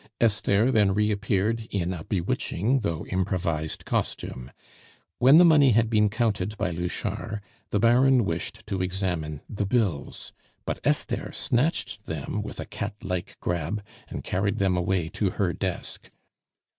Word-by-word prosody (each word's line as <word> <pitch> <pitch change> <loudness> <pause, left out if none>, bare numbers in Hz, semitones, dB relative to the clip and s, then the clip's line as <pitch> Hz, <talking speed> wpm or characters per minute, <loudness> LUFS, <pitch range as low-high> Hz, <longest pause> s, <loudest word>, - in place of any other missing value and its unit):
Esther 110 +1 +3
then 105 -5 +3
reappeared 105 +1 0
in 90 -2 -1
a 80 -3 -6
bewitching, 100 +6 0
though 85 -7 -2
improvised, 85 -4 -1
costume. 65 +1 -2 0.7
When 135 +5 +7
the 175 - +8
money 145 -6 +6
had 115 +1 +3
been 105 -1 +4
counted 105 -2 -1
by 100 -3 -1
Louchard, 90 +4 -3 0.3
the 105 - +1
Baron 120 +2 +5
wished 85 -1 -3
to 95 -2 -2
examine 90 -5 -2
the 105 -2 -2
bills; 100 - -1 0.3
but - - -2
Esther - - 0
snatched 135 +8 0
them - - -3
with - - -7
a - - -4
cat 105 0 -5
like 90 -3 -4
grab, 90 +4 -2 0.2
and - - -6
carried 100 +2 0
them 95 -2 +2
away 90 -1 0
to 100 +2 0
her 90 -4 +1
desk. 95 -3 -5
100 Hz, 145 wpm, -26 LUFS, 90-110 Hz, 0.7 s, the